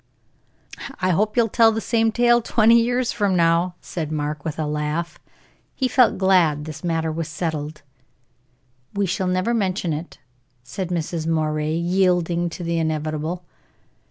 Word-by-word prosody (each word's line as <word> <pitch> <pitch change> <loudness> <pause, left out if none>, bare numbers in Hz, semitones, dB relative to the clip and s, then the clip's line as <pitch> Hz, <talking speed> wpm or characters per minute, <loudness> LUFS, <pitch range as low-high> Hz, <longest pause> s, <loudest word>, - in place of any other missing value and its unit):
"I 185 -1 +1
hope 210 +6 0
you'll 235 -1 +4
tell 225 +1 +4
the 220 - -2
same 225 0 +1
tale 240 +1 +3
twenty 230 +1 +4
years 245 +1 0
from 200 -3 0
now," 170 +1 +2
said 160 -3 -5
Mark, 150 -1 -3
with 160 -2 -4
a 155 - -1
laugh. 150 +3 -3 0.6
He 260 - 0
felt 250 -1 +3
glad 175 -6 +3
this 155 -1 -8
matter 165 -2 -1
was 160 0 -3
settled. 155 -2 -4 1.1
"We 200 0 +1
shall 185 +1 -1
never 185 +5 0
mention 190 -6 -1
it," 155 +3 -7 0.5
said 175 +9 -5
Mrs. 165 -2 -3
Moray, 155 -1 0
yielding 175 -1 +1
to 175 - -7
the 170 0 -1
inevitable. 155 +2 -2
170 Hz, 150 wpm, -22 LUFS, 155-200 Hz, 1.1 s, you'll